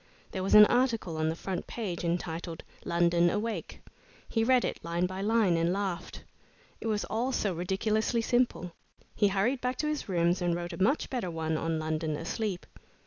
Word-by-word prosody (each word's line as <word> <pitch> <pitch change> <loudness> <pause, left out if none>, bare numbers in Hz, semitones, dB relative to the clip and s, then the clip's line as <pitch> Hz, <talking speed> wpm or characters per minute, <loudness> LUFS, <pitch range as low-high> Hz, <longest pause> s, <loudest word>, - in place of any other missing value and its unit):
There 190 - -3
was 190 - +2
an 210 0 +11
article 235 -8 +1
on 155 0 +1
the 160 - -2
front 185 +1 -4
page 190 -8 -4
entitled 170 -1 -3 0.2
"London 170 0 +3
Awake." 220 +4 -3 0.5
He 225 - 0
read 255 +1 +4
it - - -4
line 170 +2 0
by 185 +1 -4
line 210 -4 +3
and 165 +1 +2
laughed. 190 -2 -3 0.6
It - - -4
was 210 -2 0
all 240 +4 -1
so 205 -6 0
ridiculously 215 +6 0
simple. 240 -7 +1 0.4
He 205 - +4
hurried 200 +7 +1
back 250 0 -1
to 305 - -1
his 300 -7 -3
rooms 175 0 +2
and 175 -1 +1
wrote 175 0 -4
a - - -6
much 260 +11 +2
better 240 -9 -2
one 160 -1 -2
on 165 +1 -1
"London 155 0 -2
Asleep." 200 +3 -3
190 Hz, 185 wpm, -29 LUFS, 170-225 Hz, 0.6 s, an